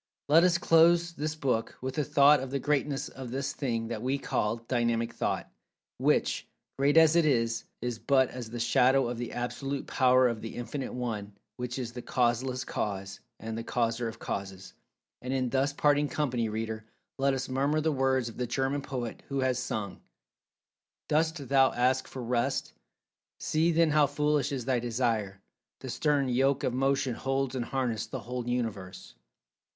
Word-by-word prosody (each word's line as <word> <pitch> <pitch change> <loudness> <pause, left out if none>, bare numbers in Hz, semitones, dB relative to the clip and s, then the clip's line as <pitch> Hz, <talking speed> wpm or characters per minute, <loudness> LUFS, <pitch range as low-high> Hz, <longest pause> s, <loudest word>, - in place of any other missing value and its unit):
Let 160 +4 +6
us 180 -1 +4
close 170 +1 +4
this 155 0 -3
book 130 -7 -1
with 130 0 -4
the 150 - 0
thought 145 0 +5
of 130 0 -5
the 140 - -1
Greatness 145 0 0
of 130 -2 -8
this 135 +3 -3
Thing 115 -5 -2
that 115 -2 -4
we 130 +3 0
call 105 -4 -1
Dynamic 115 -1 -1
Thought—which, - - -2 0.3
great 140 +3 +2
as 160 0 +7
it 170 - +5
is, 115 -6 +1 0.2
is 120 -2 -3
but 130 -1 +3
as 125 -3 -7
the 120 +1 -6
shadow 125 +3 +3
of 120 -1 -4
the 120 - -4
Absolute 135 +3 -3
Power 130 -1 +4
of 115 -2 -3
The 115 - -7
Infinite 120 +3 -5
One, 105 -5 -4 0.2
which 125 0 -4
is 125 -3 -4
the 125 - -6
Causeless 125 +2 0
Cause, 100 -5 -4 0.2
and 110 0 -5
the 115 - -4
Causer 115 0 -1
of 115 0 -6
Causes. 95 -3 -6 0.5
And 130 +1 -3
in 130 -2 -1
thus 135 +1 +1
parting 145 0 +2
company, 125 -7 -1
reader, 110 0 -4 0.4
let 135 0 +2
us 135 0 -3
murmur 140 +4 +1
the 155 +1 +1
words 130 -3 +1
of 115 - -9
the 125 - -2
German 135 +3 -1
poet, 125 -4 -5
who 140 -1 -1
has 130 -1 +1
sung: 105 -6 -4 1.1
"Dost 155 -2 0
thou 135 0 +4
ask 130 +2 +1
for 130 - -7
rest? 120 0 -1 0.7
See 165 +1 +1
then 165 -1 +3
how 150 -1 +4
foolish 150 0 0
is 130 -4 -3
thy 130 -2 +1
desire; 115 -5 -1 0.4
the - - -6
stern 145 -3 +1
yoke 135 +3 +2
of 125 - 0
motion 135 0 +1
holds 135 +1 -1
in 130 - -1
harness 120 -3 -2
the - - -5
whole 125 0 -5
Universe. 105 -6 -4
130 Hz, 175 wpm, -29 LUFS, 120-140 Hz, 1.1 s, as